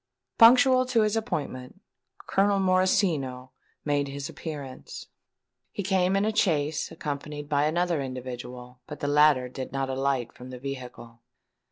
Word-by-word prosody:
Punctual 255 +2 +7
to 235 -3 +3
his 215 0 +1
appointment, 150 - -4 0.5
Colonel 200 +1 +2
Morosino 175 -9 +1 0.3
made 145 -1 +1
his 140 0 -6
appearance. 145 -5 -8 0.7
He 200 - -4
came 190 0 +2
in 195 +1 +2
a 220 0 -1
chaise, 155 -7 +1
accompanied 145 0 -5
by 145 0 +1
another 170 0 0
individual; 125 -1 -7
but 150 - -8
the 145 - -2
latter 145 -3 +4
did 130 +1 -7
not 135 0 -2
alight 130 -2 -1
from 125 +1 -11
the 130 - -8
vehicle. 125 -3 -8
145 Hz, 140 wpm, -27 LUFS, 130-185 Hz, 0.7 s, Punctual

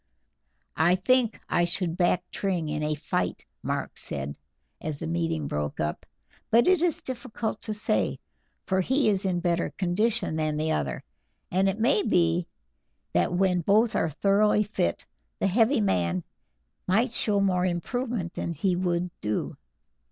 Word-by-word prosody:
"I 170 +3 +4
think 235 +4 +2
I 175 - +2
should 175 -1 -1
back 180 0 +2
Tring 180 -6 -1
in 150 0 -2
a 150 0 0
fight," 115 - -2 0.2
Mark - - -3
said, 70 +1 -2 0.5
as 155 -2 -3
the 165 - -5
meeting 165 -2 -1
broke 75 0 -3
up, 75 0 -3 0.4
"but 235 +2 +5
it 370 -3 +4
is 345 -3 +1
difficult 235 -4 -4
to 215 - -3
say, 210 - 0 0.5
for 190 -2 +1
he 265 +6 +2
is 200 -1 +1
in 175 -2 0
better 170 -1 +1
condition 190 -1 0
than 155 -1 0
the 155 +1 0
other, 70 -4 -2 0.5
and 190 +2 +3
it 195 - -2
may 255 - +3
be 170 - +2 0.7
that - - +2
when 180 0 +2
both 215 +6 +3
are 165 - +1
thoroughly 205 +6 +3
fit 140 - -2 0.3
the - - -1
heavy 225 +6 +3
man 90 - +1 0.6
might 220 +6 +2
show 210 -3 +1
more 185 -2 +2
improvement 190 +1 -2
than 170 - -3
he 180 +4 0
would 175 -1 -1
do." 105 0 -2
180 Hz, 155 wpm, -27 LUFS, 160-215 Hz, 0.7 s, but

